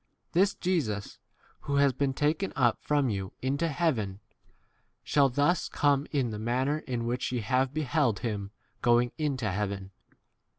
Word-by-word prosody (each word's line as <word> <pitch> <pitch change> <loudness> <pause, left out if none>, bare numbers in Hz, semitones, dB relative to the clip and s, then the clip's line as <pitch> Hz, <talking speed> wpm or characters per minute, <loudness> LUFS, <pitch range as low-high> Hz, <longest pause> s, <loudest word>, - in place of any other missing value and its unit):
This 195 +3 +3
Jesus, 120 - -2 0.5
who 140 - 0
has 140 -1 +4
been 140 +1 0
taken 155 +8 0
up - - +2
from 145 -2 +1
you 95 -1 -4
into 140 +5 0
heaven, 130 - 0 0.8
shall 140 -2 +3
thus 145 +7 +1
come 145 0 +2
in 130 -6 0
the 105 - -5
manner 130 +6 0
in 125 -6 -3
which 120 +2 -1
ye 125 -2 -1
have 130 +4 +1
beheld 145 -6 +1
12 110 +4 -2
him 100 -1 -6 0.3
going 120 0 +3
into 130 -8 -1
heaven. 100 -1 -3
130 Hz, 155 wpm, -29 LUFS, 110-145 Hz, 0.8 s, has